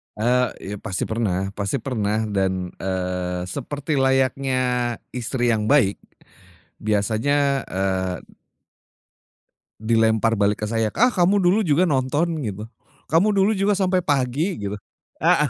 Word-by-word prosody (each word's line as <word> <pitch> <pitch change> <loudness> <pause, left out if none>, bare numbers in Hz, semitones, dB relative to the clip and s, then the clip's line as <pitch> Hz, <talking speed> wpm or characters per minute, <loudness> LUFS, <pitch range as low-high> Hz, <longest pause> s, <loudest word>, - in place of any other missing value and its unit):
Eee, 125 +3 +2 0.2
iya 105 - -4
pasti 95 -2 -3
pernah 95 -4 -1
pasti 100 +7 -1
pernah 110 -4 -1
dan, 95 -2 -1
eee, 90 -1 -3
seperti 145 - -3
layaknya, 135 0 +1 0.5
istri 120 0 -1
yang 110 -2 +1
baik 115 -6 +3 0.8
biasanya, 135 +7 +1
eee 95 -1 -1 1.7
dilempar 110 0 +2
balik 100 +1 +1
ke - - -3
saya, 115 -1 0
"Ah, 245 +6 +4
kamu 195 -1 +2
dulu 185 +4 +3
juga 155 +3 +3
nonton" 145 +5 +1 0.2
gitu, 105 +1 -5 0.4
"kamu 170 +7 +4
dulu 195 +2 +3
juga 200 +1 +2
sampai 185 -1 +1
pagi" 145 +6 0 0.2
gitu. 105 - -5 0.4
Heeh, 150 -1 +3
120 Hz, 125 wpm, -22 LUFS, 100-145 Hz, 1.7 s, Ah